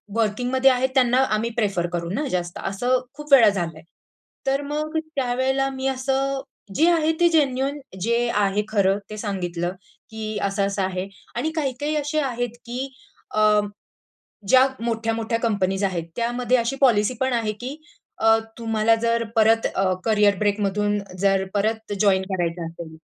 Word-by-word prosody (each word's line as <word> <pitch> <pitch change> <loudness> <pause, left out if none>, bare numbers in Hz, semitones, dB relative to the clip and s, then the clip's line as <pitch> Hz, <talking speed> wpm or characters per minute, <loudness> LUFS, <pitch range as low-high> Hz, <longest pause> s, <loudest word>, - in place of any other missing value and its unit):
वर्किंगमध्ये 245 +4 +2
आहेत 255 +1 +1
त्यांना 250 -2 +3 0.2
आम्ही 225 +2 -1
प्रिफर 195 -6 0
करू 170 -1 -2
ना 295 +7 -1
जास्त. 175 -1 -2
असं 245 +6 +1
खूप 295 0 -3
वेळा 235 -6 +8
झालंय. 170 -5 -3 0.7
तर 270 +1 +2
मग 305 +2 -3 0.2
त्यावेळेला 265 +1 0
मी 265 0 -3
असं, 270 +1 -1 0.3
जे 320 - +4
आहे 320 -2 +2
ते 345 - +5
जेन्युइन 280 -3 +1 0.2
जे 235 +4 +1 0.2
आहे 205 0 +2
खरं 200 -2 +2
ते 215 - -7
सांगितलं, 180 -5 -3 0.4
की 220 -1 -5
असं-असं 200 0 0
आहे 185 0 -2 0.3
आणि 290 +7 -1
काही-काही 290 0 -1
असे 300 +1 0
आहेत, 245 -4 -2
की 250 +3 -4 0.5
अ, - - +2 1.1
ज्या 260 +5 +6 0.2
मोठ्या-मोठ्या 225 0 -1
कंपनीज 200 -4 0
आहेत 185 -4 0
त्यामध्ये 240 +1 +1
अशी 235 +2 -1
पॉलिसी 235 -3 +4
पण 260 -1 +1
आहे, 225 -3 0
की 250 +6 -7 0.4
अ, 225 0 +5 0.2
तुम्हाला 225 -1 +2
जर 230 0 +2
परत 225 0 +4
अ, 190 -1 +2
कॅरियर 210 -3 +3
ब्रेक 205 0 +1
मधून 205 +1 0 0.2
जर 195 0 +2
परत 220 +1 -1
जॉइन 195 -3 +4
करायचं 170 -2 -2
असेल, 165 -1 -9
225 Hz, 150 wpm, -23 LUFS, 200-260 Hz, 1.1 s, वेळा